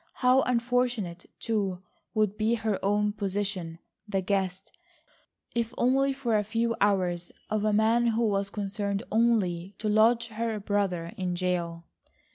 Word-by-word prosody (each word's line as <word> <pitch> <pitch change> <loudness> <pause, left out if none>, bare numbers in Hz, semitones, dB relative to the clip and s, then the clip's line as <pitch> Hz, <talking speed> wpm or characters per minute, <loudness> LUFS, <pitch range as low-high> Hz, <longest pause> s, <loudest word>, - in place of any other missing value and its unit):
How 255 +1 +4
unfortunate, 240 -7 0
too, 195 -5 -1 0.3
would 215 -2 +2
be 220 +2 +1
her 220 -3 -2
own 205 +1 +2
position,—the 195 -1 -3
guest, 190 -1 -2 0.8
if 235 +1 -2
only 270 +3 +3
for 265 -5 -1
a 210 - +2
few 230 +2 0
hours, 180 -4 +1 0.2
of 215 -1 0
a 215 - +2
man 225 +3 +3
who 230 0 +2
was 200 -1 0
concerned 200 0 -3
only 200 -5 +1
to 215 - -3
lodge 230 +2 +4
her 225 0 -2
brother 195 -4 -1
in 180 -2 -2
jail. 175 -2 -2
210 Hz, 135 wpm, -28 LUFS, 190-230 Hz, 0.8 s, How